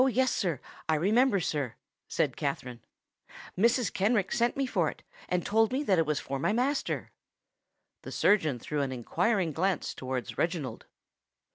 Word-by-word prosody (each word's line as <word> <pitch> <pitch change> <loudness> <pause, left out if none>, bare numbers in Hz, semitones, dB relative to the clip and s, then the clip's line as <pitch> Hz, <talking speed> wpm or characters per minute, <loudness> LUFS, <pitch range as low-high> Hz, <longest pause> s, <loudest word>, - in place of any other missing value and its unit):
"Oh! 260 - +5
yes—I 195 - 0
remember, 205 - +3
sir," 145 -8 -2 0.3
said 135 -6 0
Katherine: 125 -5 -3 0.7
"Mrs. 235 +3 +2
Kenrick 200 0 +1
sent 235 +2 +1
me 275 - +1
for 255 - +1
it, - - -11 0.3
and 180 -1 0
told 225 +2 +3
me 270 +3 0
that 190 - +3
it 160 - +2
was 150 -1 +1
for 135 0 -4
my 165 - +1
master." 260 +6 -1 0.9
The - - -8
surgeon 160 -11 +3
threw 145 +5 -3
an 135 -1 -1
inquiring 170 - 0
glance 185 +2 0
towards 130 -4 -4
Reginald. 160 -9 -2
180 Hz, 150 wpm, -29 LUFS, 140-230 Hz, 0.9 s, Oh